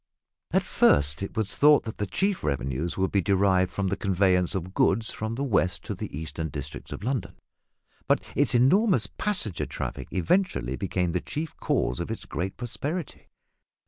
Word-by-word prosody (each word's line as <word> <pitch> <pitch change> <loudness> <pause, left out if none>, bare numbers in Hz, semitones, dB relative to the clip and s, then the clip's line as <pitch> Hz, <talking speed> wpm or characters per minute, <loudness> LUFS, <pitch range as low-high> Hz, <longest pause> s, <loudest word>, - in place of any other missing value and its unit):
At - - +2
first 70 +3 +3
it 100 +3 -5
was 105 -2 0
thought 150 0 +6
that 110 - -7
the 105 - -1
chief 195 - 0
revenues 70 +3 -2
would 95 0 +1
be 100 - +3
derived 95 -1 +2
from 100 -1 -1
the 100 - 0
conveyance 95 -1 +2
of 95 0 -4
goods 110 +4 +2
from 110 +1 -4
the 135 - -2
west 95 -8 +1
to - - -4
the - - -5
eastern 80 0 -4
districts 70 0 -7
of - - -6
London, 120 -7 -2 0.7
but - - +4 0.2
its 130 -4 +2
enormous 185 - +4
passenger 180 - -2
traffic 65 - -5
eventually 90 - +1
became 90 +6 -1
the 90 +1 -1
chief 155 +1 -5
cause - - 0
of - - -3
its - - -5
great 95 +2 -4
prosperity. 145 +7 -5
95 Hz, 175 wpm, -27 LUFS, 85-125 Hz, 0.7 s, thought